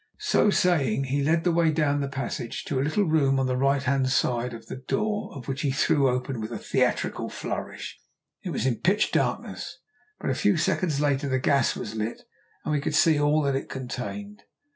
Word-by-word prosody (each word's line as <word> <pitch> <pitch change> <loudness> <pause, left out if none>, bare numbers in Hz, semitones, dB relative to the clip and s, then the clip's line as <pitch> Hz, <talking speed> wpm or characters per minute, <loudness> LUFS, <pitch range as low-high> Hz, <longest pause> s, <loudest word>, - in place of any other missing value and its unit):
So 210 - +3
saying 145 - +2
he 140 +2 -1
led 165 +3 +2
the 175 - +2
way 165 -1 +3
down 150 -2 +1
the 140 - -1
passage 135 -3 -4
to 135 - -1
a - - +2
little 155 +9 +1
room 145 -6 +2
on 135 - +1
the 130 0 0
right 135 +1 +2
hand 135 -1 +1
side, 125 -2 +1
the - - -7
door 210 +10 -2
of 135 - -9
which 135 0 -3
he 145 - +1
threw 140 0 +3
open 125 -1 -2
with 110 +2 -5
a - - -3
theatrical - - 0
flourish. - - -5 0.4
It - - -5
was - - -2
in 125 -3 +1
pitch 190 +4 +2
darkness, - - -2 0.4
but - - -1
a - - +1
few - - +2
seconds 155 -7 0
later 140 -1 +1
the 130 - +2
gas 135 0 +2
was 110 - -5
lit 110 +1 -4 0.4
and - - -1
we 145 - +1
could 150 - -1
see 160 -3 +4
all 150 +1 +3
that 140 -1 +1
it 135 - -3
contained. 130 +11 -6
140 Hz, 205 wpm, -26 LUFS, 130-155 Hz, 0.4 s, see